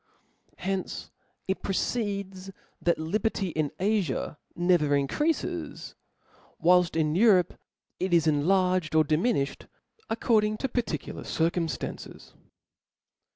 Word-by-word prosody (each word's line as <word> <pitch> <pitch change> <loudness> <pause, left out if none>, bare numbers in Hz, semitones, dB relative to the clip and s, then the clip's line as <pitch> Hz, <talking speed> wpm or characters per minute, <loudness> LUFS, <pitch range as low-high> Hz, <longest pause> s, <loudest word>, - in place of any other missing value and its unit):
From - - -39
hence 195 -1 -3 0.4
it 190 - -1
proceeds, 195 -2 -2 0.3
that 170 - +2
lijjerty 195 +3 -1
in 155 -2 0
Afia 190 -7 0 0.2
never 175 -5 +3
increafes; 295 - -1 0.7
whilft 180 0 +4
in 155 -2 +1
Europe 185 -2 +4 0.5
it 185 0 -1
is 170 -2 +4
enlarged 180 +3 +2
ordi 155 -2 +3
miniflied, 165 - 0 0.4
according 215 -2 +2
to 270 - -1
particular 230 - -3
circumftances. 165 -2 -3
180 Hz, 100 wpm, -27 LUFS, 160-205 Hz, 0.7 s, whilft